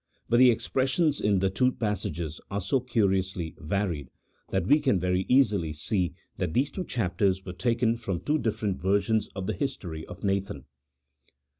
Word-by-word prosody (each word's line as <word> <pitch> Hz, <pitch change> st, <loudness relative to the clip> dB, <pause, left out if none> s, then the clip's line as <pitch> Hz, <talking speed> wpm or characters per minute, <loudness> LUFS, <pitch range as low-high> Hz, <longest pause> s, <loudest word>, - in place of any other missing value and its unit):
bnt 120 Hz, -, +5 dB
the 130 Hz, 0 st, +8 dB
expressions 135 Hz, +6 st, +1 dB
in 100 Hz, -1 st, +3 dB
the 95 Hz, +1 st, +2 dB
two 125 Hz, +6 st, +2 dB
passages 85 Hz, -7 st, -3 dB
are 100 Hz, -, -2 dB
so 135 Hz, +7 st, +1 dB
curiously 95 Hz, -8 st, 0 dB
varied, 85 Hz, -4 st, -2 dB, 0.4 s
1 -, -, 0 dB
that -, -, -5 dB
we 145 Hz, +5 st, +6 dB
can 130 Hz, -10 st, +2 dB
very 90 Hz, +1 st, 0 dB
easily 105 Hz, -, +3 dB
see 90 Hz, +4 st, -1 dB, 0.2 s
that 85 Hz, -3 st, -2 dB
these 135 Hz, +3 st, +2 dB
two 185 Hz, -, -4 dB
chapters 95 Hz, -, 0 dB
were 90 Hz, -, -5 dB
taken 115 Hz, +3 st, +1 dB
from 100 Hz, -7 st, -3 dB
two 150 Hz, -, 0 dB
different 105 Hz, -5 st, -1 dB
versions 100 Hz, +3 st, +1 dB
of 95 Hz, -1 st, -4 dB
the -, -, -1 dB
history 90 Hz, -, -4 dB
of 90 Hz, -, -10 dB
Nathan. 95 Hz, -9 st, -1 dB
100 Hz, 170 wpm, -27 LUFS, 90-120 Hz, 0.4 s, the